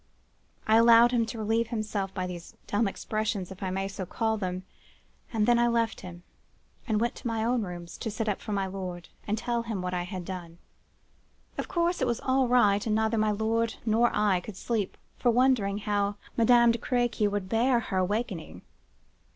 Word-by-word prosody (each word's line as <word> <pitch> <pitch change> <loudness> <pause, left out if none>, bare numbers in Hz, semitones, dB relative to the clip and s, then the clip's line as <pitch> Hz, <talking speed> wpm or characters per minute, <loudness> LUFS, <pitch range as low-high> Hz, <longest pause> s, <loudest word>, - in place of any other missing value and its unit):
I 220 +1 +5
allowed 230 +1 +7
him 235 -2 +1
to 225 - -6
relieve 225 +1 0
himself 215 -4 -3
by 185 -1 -3
these 175 -2 -8
dumb 205 +1 +1
expressions, 210 -2 -3
if 190 - -10
I 190 - -2
may 195 +1 -2
so 195 -1 -5
call 220 +4 -1
them,—and 190 +3 -5
then 240 0 +4
I 240 - +4
left 230 -1 0
him, 175 -1 -10 0.6
and 215 -3 +1
went 235 +1 0
to - - -5
my 225 -1 -1
own 240 +1 +1
rooms 175 -3 -7
to 225 - -3
sit 220 +1 -3
up 205 - -1
for 215 - -6
my 200 -1 0
lord, 185 -2 -6 0.2
and 210 +1 0
tell 235 +1 -1
him 225 -4 -4
what 180 0 -3
I 180 - 0
had 180 0 -6
done. 175 -3 -7 1.0
"Of - - -4
course, 345 -1 0
it 260 - +2
was 235 -1 0
all 260 0 +2
right; 210 -5 +4
and 215 -2 0
neither 220 +1 +1
my 215 0 +2
lord 220 +2 0
nor 230 +2 +3
I 205 -3 +2
could 190 +2 -9
sleep 220 -5 -2 0.2
for 245 - +3
wondering 240 -5 +3
how 205 -1 0 0.2
Madame 235 0 +5
de 230 - -2
Crequy 240 -3 +1
would 200 -2 -3
bear 235 +4 +3
her 195 -4 -3
awakening. 200 -2 -3
215 Hz, 195 wpm, -28 LUFS, 195-235 Hz, 1.0 s, allowed